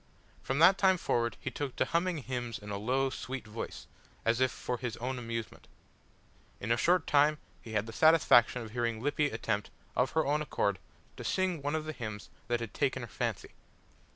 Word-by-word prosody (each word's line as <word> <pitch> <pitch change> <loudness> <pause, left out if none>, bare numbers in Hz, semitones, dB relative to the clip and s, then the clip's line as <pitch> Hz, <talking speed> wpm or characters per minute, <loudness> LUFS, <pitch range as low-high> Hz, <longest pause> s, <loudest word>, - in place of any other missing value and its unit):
From 135 - -2
that 180 +5 +7
time 190 -1 +5
forward 120 -8 0
he - - -4
took 140 -3 -4
to - - +2
humming 170 -1 0
hymns 120 -3 -3
in 105 0 -9
a 100 - -2
low, 130 +5 +1
sweet 130 0 -5
voice, 110 +1 -6 0.4
as 115 +2 +2
if 130 0 +4
for 125 - -3
his 120 -3 -4
own 125 +1 -3
amusement. 115 -2 -5 0.9
In 115 - -3
a - - +5
short 175 +7 +3
time 150 +1 +4 0.2
he 110 - -9
had 105 -1 +1
the 110 - -8
satisfaction 125 -6 +5
of 110 - -9
hearing 115 -1 -1
Lippy 145 +3 +1
attempt, 110 -3 -2 0.3
of 125 +1 +1
her 160 - +2
own 150 +2 +1
accord, 100 -9 0 0.4
to - - -6
sing 185 -4 0
one 145 +2 -1
of 155 -1 -2
the 155 - -4
hymns 110 -6 -6 0.2
that 120 0 0
had 115 - -5
taken - - 0
her - - -6
fancy. - - -3
125 Hz, 200 wpm, -31 LUFS, 115-150 Hz, 0.9 s, that